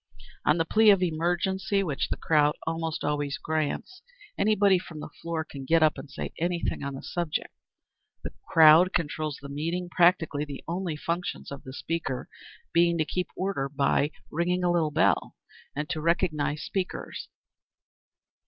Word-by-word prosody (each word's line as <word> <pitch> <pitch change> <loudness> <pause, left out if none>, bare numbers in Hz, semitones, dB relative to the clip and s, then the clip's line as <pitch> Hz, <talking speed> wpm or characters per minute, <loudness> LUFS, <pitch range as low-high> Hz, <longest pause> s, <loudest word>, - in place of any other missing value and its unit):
On 150 - +5
the 165 - +1
plea 215 +5 +5
of 195 -2 +5
"emergency," 180 +4 0
which 150 -7 -2
the - - -2
crowd 150 -2 +3
almost 165 -1 -2
always 145 -1 -1
grants, 160 - -3 0.3
anybody 200 -3 +3
from 165 -3 -10
the 150 - -8
floor 165 -1 -2
can 140 -2 -9
get 165 +4 +3
up 155 - +4
and 145 - -10
say - - -6
anything 170 +1 -1
on 140 0 -4
any 135 - -8
subject. 170 -3 -3 0.7
The - - -6
crowd 165 +3 +7
controls 155 -2 -2
the 140 - -9
meeting, 165 +5 -3
practically 170 -5 +3
the 145 -2 -7
only 175 -1 -2
functions 170 +2 -4
of 140 - -7
the 130 - -9
speaker 160 -3 -3 0.5
being 170 0 +4
to 155 - +1
keep 180 +3 -2
order 185 -8 -2
by 140 +1 +1 0.2
ringing 180 +3 0
a 175 - +3
little 165 -3 +2
bell, 150 - +1 0.4
and 150 +1 -2
to 155 - -2
recognise 155 -3 0
speakers. 190 -2 -4
165 Hz, 160 wpm, -27 LUFS, 150-180 Hz, 0.7 s, crowd